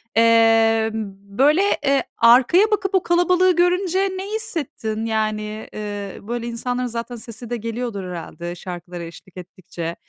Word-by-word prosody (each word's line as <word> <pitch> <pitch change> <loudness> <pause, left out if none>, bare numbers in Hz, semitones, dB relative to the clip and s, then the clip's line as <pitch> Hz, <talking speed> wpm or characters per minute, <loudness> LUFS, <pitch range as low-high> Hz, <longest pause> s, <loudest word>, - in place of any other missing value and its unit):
Emm, 225 -2 +3 0.2
böyle, 295 +7 +5 0.2
eee, 275 -1 +3
arkaya 260 - +5
bakıp 390 -1 0
o 375 - +3
kalabalığı 355 +1 +3
görünce 360 +1 +2
ne 380 -1 -1
hissettin? 250 - -3
Yani, 215 -1 -2
eee, 205 -2 -6
böyle 235 +3 -4
insanların 245 +1 -2
zaten 235 +1 -5
sesi 230 +1 -10
de 240 - -2
geliyordur 230 -2 -4
herhâlde 175 0 -6
şarkılara 175 -1 -7
eşlik 170 +2 -12
ettikçe. 175 -2 -7
230 Hz, 130 wpm, -21 LUFS, 210-300 Hz, 0.2 s, böyle